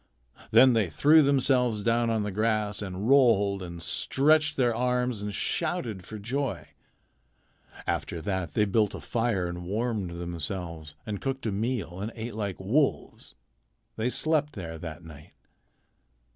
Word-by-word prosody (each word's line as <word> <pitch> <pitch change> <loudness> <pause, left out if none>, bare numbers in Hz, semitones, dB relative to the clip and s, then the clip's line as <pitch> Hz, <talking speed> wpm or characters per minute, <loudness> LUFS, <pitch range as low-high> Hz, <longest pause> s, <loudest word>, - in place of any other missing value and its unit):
Then 130 -1 +7
they 110 -6 +1
threw 150 - +5
themselves 125 -6 +2
down 115 +1 +2
on 110 -2 0
the 105 - -3
grass 105 0 0
and 95 +1 -4
rolled 115 -8 +4
and 85 -2 -7
stretched 155 - +3
their 120 -3 +3
arms 125 -2 0
and 105 0 -3
shouted 120 - -2
for 110 - -8
joy. 130 +6 -3 1.2
After 85 - -2
that 90 -2 -3
they 105 - +3
built 105 +1 +1
a - - -6
fire 115 -6 -1
and 85 0 -5
warmed 105 0 -2
themselves 85 -2 -6
and 105 -2 -4
cooked 135 -1 -3
a 110 - 0
meal 105 -4 -2
and 105 +3 -4
ate 115 +1 -5
like 100 -3 -4
wolves. 130 +10 -1 0.6
They 115 +3 -1
slept 150 +1 0
there 80 -5 -7
that 85 +1 -8
night. 75 -2 -13
110 Hz, 145 wpm, -27 LUFS, 95-125 Hz, 1.2 s, Then